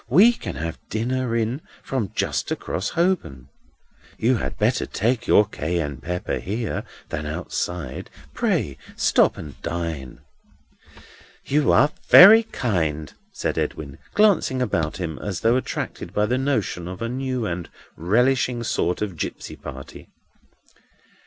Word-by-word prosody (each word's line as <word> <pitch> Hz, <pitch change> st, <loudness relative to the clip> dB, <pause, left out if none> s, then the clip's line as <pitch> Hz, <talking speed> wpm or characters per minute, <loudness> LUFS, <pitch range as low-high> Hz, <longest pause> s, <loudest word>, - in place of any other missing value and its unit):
We 195 Hz, -, +7 dB
can -, -, -6 dB
have 80 Hz, 0 st, -4 dB
dinner 120 Hz, +2 st, -1 dB
in 115 Hz, +5 st, -1 dB, 0.2 s
from 120 Hz, -8 st, -2 dB
just -, -, -1 dB
across 95 Hz, -, -2 dB
Holborn. 165 Hz, -, -1 dB, 0.7 s
You 120 Hz, +2 st, +2 dB
had -, -, -4 dB
better -, -, +1 dB
take 120 Hz, +3 st, -1 dB
your 105 Hz, -, +6 dB
Cayenne 80 Hz, -6 st, -2 dB
pepper 90 Hz, +7 st, -3 dB
here 110 Hz, +4 st, -3 dB, 0.2 s
than 75 Hz, -2 st, -4 dB
outside; 80 Hz, -3 st, -4 dB, 0.2 s
pray 70 Hz, -2 st, 0 dB, 0.2 s
stop -, -, +3 dB
and 75 Hz, -3 st, -9 dB
dine." 80 Hz, -6 st, -4 dB, 1.2 s
"You 145 Hz, +1 st, +2 dB
are 150 Hz, -, +5 dB, 0.2 s
very 215 Hz, +5 st, +10 dB
kind," 80 Hz, -, -2 dB, 0.2 s
said -, -, -2 dB
Edwin, 70 Hz, -3 st, -4 dB, 0.2 s
glancing 200 Hz, -11 st, +3 dB
about 85 Hz, -11 st, -1 dB
him 80 Hz, -5 st, -4 dB
as 95 Hz, -5 st, -4 dB
though 115 Hz, +2 st, +4 dB
attracted 130 Hz, -, -4 dB
by 105 Hz, -, +3 dB
the 125 Hz, +4 st, 0 dB
notion 110 Hz, -10 st, -1 dB
of 95 Hz, +4 st, -6 dB
a -, -, -1 dB
new 130 Hz, -1 st, -2 dB
and 90 Hz, -3 st, -4 dB, 0.3 s
relishing 120 Hz, +6 st, +1 dB
sort 90 Hz, -4 st, 0 dB
of 100 Hz, -4 st, -4 dB
gipsy -, -, -5 dB
party. 70 Hz, -1 st, -10 dB
105 Hz, 135 wpm, -23 LUFS, 80-130 Hz, 1.2 s, very